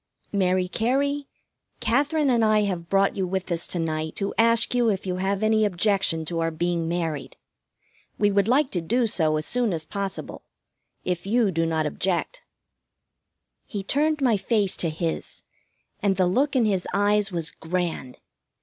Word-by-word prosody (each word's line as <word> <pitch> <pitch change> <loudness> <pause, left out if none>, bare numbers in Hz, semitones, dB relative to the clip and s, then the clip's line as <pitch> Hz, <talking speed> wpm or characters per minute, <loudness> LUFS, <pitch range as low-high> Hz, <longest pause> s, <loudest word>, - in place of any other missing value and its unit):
"Mary 185 -2 +1
Cary, 275 +7 0 0.5
Katherine 280 +5 +1
and 235 -2 +3
I 215 -1 +4
have 180 -5 -3
brought 195 0 +2
you 190 -2 -1
with 190 0 -3
us 170 0 -1
to - - -2
night 160 -1 -2
to 200 -1 -3
ask 230 +1 +4
if 225 -6 +1
you 180 -1 -2
have 195 +2 -1
any 215 0 +3
objection 190 -4 +1
to 165 +1 -3
our 165 0 +1
being 170 +1 -1
married. 165 -4 -3 0.8
We 205 0 +3
would 200 0 +2
like 265 +3 +2
to 175 - -1
do 235 +9 +1
so 160 -7 +2
as 155 - -2
soon 245 -3 +1
as 160 -2 -1
possible 195 +2 -5 0.6
if 180 +1 -2
you 225 -1 +2
do 165 -1 0
not 160 -1 0
object." 185 - -2 1.3
He 205 -3 -5
turned 300 +7 +1
my 240 -5 +3
face 205 -1 +1
to 165 - 0
his, 160 +1 -4 0.6
and 200 -2 +2
the 185 - +3
look 265 +11 +1
in 245 -3 +3
his 195 -4 0
eyes 205 0 +2
was 170 -1 -2
grand. 165 -6 -4
195 Hz, 170 wpm, -24 LUFS, 170-225 Hz, 1.3 s, I